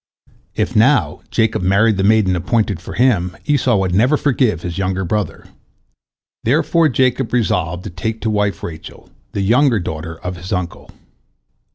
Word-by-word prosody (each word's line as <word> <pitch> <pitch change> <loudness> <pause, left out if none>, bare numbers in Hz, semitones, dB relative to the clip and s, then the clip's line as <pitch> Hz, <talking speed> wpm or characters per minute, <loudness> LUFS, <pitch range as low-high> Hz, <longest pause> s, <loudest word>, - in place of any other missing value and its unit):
If, - - -1
now, - - +3
Jacob 110 -2 0
married 100 +3 +3
the 95 - 0
maiden 100 -3 +3
appointed 100 0 -1
for - - -8
him, 95 -7 +1
Esau 135 -6 +2
would 95 -2 0
never 125 +10 +3
forgive 125 - +1
his 90 0 -4
younger 95 0 -1
brother. 105 0 -3 1.0
Therefore 160 +5 +2
Jacob 130 -1 +1
resolved 90 -7 0
to - - -7
take 110 +6 -4
to 110 - -1
wife 105 -4 -1
Rachel, 80 -2 -9 0.2
the 100 - -2
younger 120 +3 +3
daughter 80 -1 -6
of 90 0 -5
his 90 +2 -9
uncle. 90 -2 -4
100 Hz, 155 wpm, -18 LUFS, 90-120 Hz, 1.0 s, now